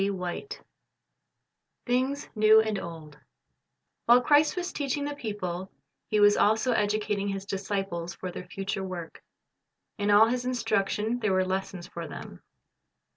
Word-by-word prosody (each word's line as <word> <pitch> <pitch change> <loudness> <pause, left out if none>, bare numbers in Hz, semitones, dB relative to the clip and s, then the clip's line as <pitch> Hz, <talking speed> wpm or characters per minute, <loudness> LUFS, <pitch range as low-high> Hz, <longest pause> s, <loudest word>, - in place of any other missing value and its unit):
33: 190 -2 -2
II - - -14 1.4
Things 260 +3 0
N 215 - -5
evo 220 +1 +7
and 210 -2 -1
Old" 165 -3 -8
TT - - -19 0.9
Zl/ILE 245 +1 +8
Christ 295 +4 +4
was 360 0 -3
teaching 285 0 -2
the 290 - -3
people, 190 -8 -5 0.4
He 215 - +1
was 205 0 +6
also 220 +4 +3
educating 210 -2 0
His 195 -1 -3
disciples 195 -3 -3
for 185 - -6
their 180 0 -8
future 195 +1 -4
work. 180 -3 -7 0.8
In 205 0 0
all 205 +2 +7
His 250 +1 -1
instruction 225 -2 0
there 215 -4 +1
were 185 0 +2
lessons 190 -1 -3
for 170 -1 -7
them. - - -9
205 Hz, 150 wpm, -28 LUFS, 190-235 Hz, 1.4 s, Zl/ILE